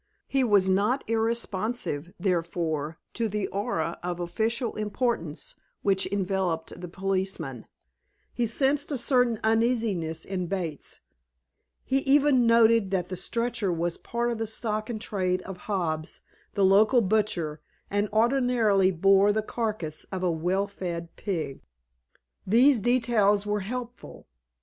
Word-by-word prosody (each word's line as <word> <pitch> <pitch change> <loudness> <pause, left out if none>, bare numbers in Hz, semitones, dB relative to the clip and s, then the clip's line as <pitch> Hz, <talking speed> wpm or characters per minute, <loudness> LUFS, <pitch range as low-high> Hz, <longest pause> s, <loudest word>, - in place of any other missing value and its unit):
He 270 -1 +1
was 205 -5 +4
not 205 +8 +2
irresponsive, 225 -6 -1
therefore, 165 -4 -1 0.2
to 230 - -1
the 210 0 -1
aura 190 -5 -2
of 175 0 -4
official 225 +7 -1
importance 210 - -2 0.3
which 195 -1 +2
enveloped 185 -4 -2
the 180 - -5
policeman; 185 - -3 0.7
he 240 -1 0
sensed 275 +6 +1
a 280 - 0
certain 245 -3 +2
uneasiness 220 -8 +1
in 185 -2 -3
Bates; 170 -6 -4 0.8
he 265 +1 +1
even 275 -3 +4
noted 230 -3 +5
that 185 -2 -1
the 185 - -3
stretcher 230 0 -1
was 170 0 -2
part 235 0 -2
of 230 - -4
the 225 - -2
stock 215 0 -3
in 235 - -2
trade 185 -4 -1
of 190 -2 -7
Hobbs, 160 -5 -2 0.3
the 200 -2 +3
local 215 +6 +5
butcher, 185 -7 0 0.3
and 205 +1 0
ordinarily 225 -4 +3
bore 195 +3 +4
the 215 +1 0
carcase 210 -10 -3
of 185 -1 -3
a 180 - +2
well 180 +5 0
fed 175 -4 -6
pig. 165 -9 -4 0.9
These 245 +5 +5
details 220 -4 +2
were 210 0 0
helpful. 245 +4 -7
200 Hz, 130 wpm, -27 LUFS, 180-230 Hz, 0.9 s, noted